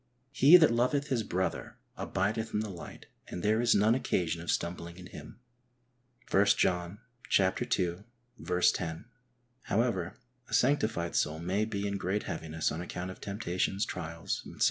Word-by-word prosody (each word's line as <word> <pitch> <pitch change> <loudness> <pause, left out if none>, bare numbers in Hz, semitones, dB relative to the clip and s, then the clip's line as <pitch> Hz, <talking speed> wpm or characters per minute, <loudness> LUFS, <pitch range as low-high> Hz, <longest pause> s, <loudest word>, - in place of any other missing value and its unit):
He 140 +5 +8
that 160 -7 +5
loveth 135 +5 +1
his 125 -4 +1
brother 95 -3 -3 0.2
abideth 110 +4 -2
in 105 - +2
the 110 -2 -4
light, 85 - -10 0.2
and 90 - -6
there 110 +2 +3
is 120 -1 +4
none 105 +3 +4
occasion 85 -9 0
of 85 - -7
stumbling 85 0 -2
in 90 - -10
him 90 - -11 0.9
(i 95 - +6
John 90 -1 +1 0.4
ii. 95 +2 -2
10). 80 -2 +1 0.6
However, 100 -6 0 0.3
a - - -8
sanctified 115 - +1
soul 75 +1 +1
may 95 +6 0
be 100 -2 -3
in 100 0 -2
great 95 +2 -1
heaviness 80 -1 -2
on 80 - -4
account 90 +1 -5
of - - -13
temptations, 100 0 -1
trials, 85 -2 -4
etc. - - -12
95 Hz, 150 wpm, -30 LUFS, 85-110 Hz, 0.9 s, He